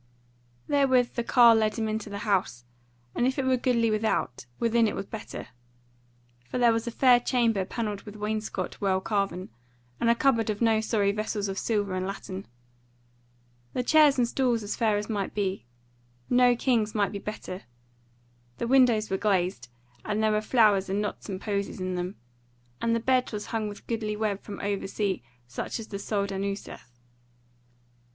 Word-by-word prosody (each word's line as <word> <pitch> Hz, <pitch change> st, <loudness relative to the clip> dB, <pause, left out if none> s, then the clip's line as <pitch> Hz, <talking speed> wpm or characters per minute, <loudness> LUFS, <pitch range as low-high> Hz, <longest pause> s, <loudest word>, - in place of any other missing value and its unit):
Therewith 260 Hz, -4 st, +3 dB
the 235 Hz, -, -1 dB
carle 235 Hz, -1 st, +7 dB
led 215 Hz, -1 st, +1 dB
him 225 Hz, -2 st, -1 dB
into 215 Hz, -1 st, -3 dB
the 200 Hz, -, -5 dB
house; 150 Hz, -, 0 dB, 0.5 s
and 245 Hz, -, +1 dB
if 260 Hz, -, -1 dB
it 270 Hz, -, 0 dB
were 260 Hz, 0 st, +3 dB
goodly 240 Hz, -3 st, +1 dB
without, 215 Hz, -, -1 dB
within 230 Hz, 0 st, +3 dB
it -, -, -2 dB
was 195 Hz, -, -4 dB
better. 220 Hz, +1 st, -8 dB, 1.0 s
For -, -, -3 dB
there 240 Hz, -2 st, +5 dB
was 225 Hz, +1 st, -2 dB
a -, -, -1 dB
fair 250 Hz, 0 st, +5 dB
chamber 230 Hz, -6 st, +1 dB
panelled 210 Hz, -2 st, -3 dB
with 210 Hz, -1 st, -11 dB
wainscot 215 Hz, +1 st, -3 dB
well 190 Hz, -2 st, +2 dB
carven, 195 Hz, -3 st, -2 dB, 0.5 s
and 230 Hz, -, +2 dB
a 235 Hz, -, +5 dB
cupboard 235 Hz, -4 st, +2 dB
of 210 Hz, -1 st, -1 dB
no 225 Hz, -2 st, +3 dB
sorry 210 Hz, -3 st, +1 dB
vessels 210 Hz, 0 st, -2 dB
of 195 Hz, 0 st, -3 dB
silver 205 Hz, -4 st, -1 dB
and 185 Hz, 0 st, -2 dB
latten: 195 Hz, -1 st, -6 dB, 1.3 s
the 250 Hz, -, -1 dB
chairs 300 Hz, 0 st, +5 dB
and 245 Hz, -2 st, +3 dB
stools 240 Hz, -3 st, 0 dB
as 205 Hz, -, -3 dB
fair 220 Hz, -3 st, +2 dB
as 210 Hz, -, -3 dB
might 205 Hz, -3 st, -3 dB
be; 195 Hz, -, -2 dB, 0.6 s
no 245 Hz, 0 st, +5 dB
king's 230 Hz, -4 st, +1 dB
might 205 Hz, -2 st, +1 dB
be 200 Hz, -, -5 dB
better: 195 Hz, -3 st, -7 dB, 0.9 s
the -, -, -2 dB
windows 235 Hz, -4 st, +4 dB
were 190 Hz, -, +1 dB
glazed, 185 Hz, -, 0 dB, 0.3 s
and 210 Hz, +1 st, -1 dB
there 215 Hz, -, +3 dB
were 210 Hz, 0 st, +1 dB
flowers 215 Hz, -4 st, +3 dB
and 195 Hz, +2 st, 0 dB
knots 210 Hz, 0 st, -4 dB
and 190 Hz, -1 st, -4 dB
posies 200 Hz, -2 st, -3 dB
in 185 Hz, 0 st, -2 dB
them; 180 Hz, +2 st, -3 dB, 0.7 s
and 230 Hz, 0 st, +2 dB
the -, -, +1 dB
bed 255 Hz, +2 st, +1 dB
was 210 Hz, -2 st, -4 dB
hung 220 Hz, -2 st, 0 dB
with 205 Hz, -, -11 dB
goodly 220 Hz, -2 st, -2 dB
web 210 Hz, -2 st, -1 dB
from 200 Hz, -, -8 dB
over 200 Hz, -1 st, -2 dB
sea 195 Hz, -1 st, -1 dB, 0.2 s
such 120 Hz, -, -5 dB
as 225 Hz, -, -8 dB
the 200 Hz, -, -5 dB
soldan 200 Hz, -1 st, -2 dB
useth. 195 Hz, -11 st, -6 dB
215 Hz, 180 wpm, -27 LUFS, 200-235 Hz, 1.3 s, carle